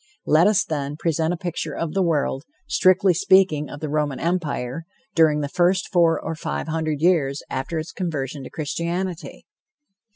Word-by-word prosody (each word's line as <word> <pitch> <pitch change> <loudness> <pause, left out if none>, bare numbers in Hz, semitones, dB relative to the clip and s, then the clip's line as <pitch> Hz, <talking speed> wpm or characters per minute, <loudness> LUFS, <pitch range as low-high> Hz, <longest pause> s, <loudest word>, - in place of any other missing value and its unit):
Let 160 +5 +5
us, 210 -2 +3
then, 145 -2 -3
present 160 0 0
a 175 - -2
picture 175 -1 -4
of 165 -2 -3
the 195 - +1
world, 150 -6 0 0.3
strictly 185 0 +4
speaking, 175 -4 +3
of 145 - -9
the 155 - -2
Roman 150 -2 -1
Empire, 165 -4 -2 0.3
during 155 -2 +4
the 145 - -2
first 180 +5 +1
four 170 -3 +3
or 165 - -4
five 160 - -4
hundred 155 -2 -2
years 150 -6 +2
after 135 +5 -3
its 160 +1 -4
conversion 145 -6 -4
to - - -8
Christianity. 170 +3 -4
160 Hz, 165 wpm, -23 LUFS, 150-175 Hz, 0.3 s, Let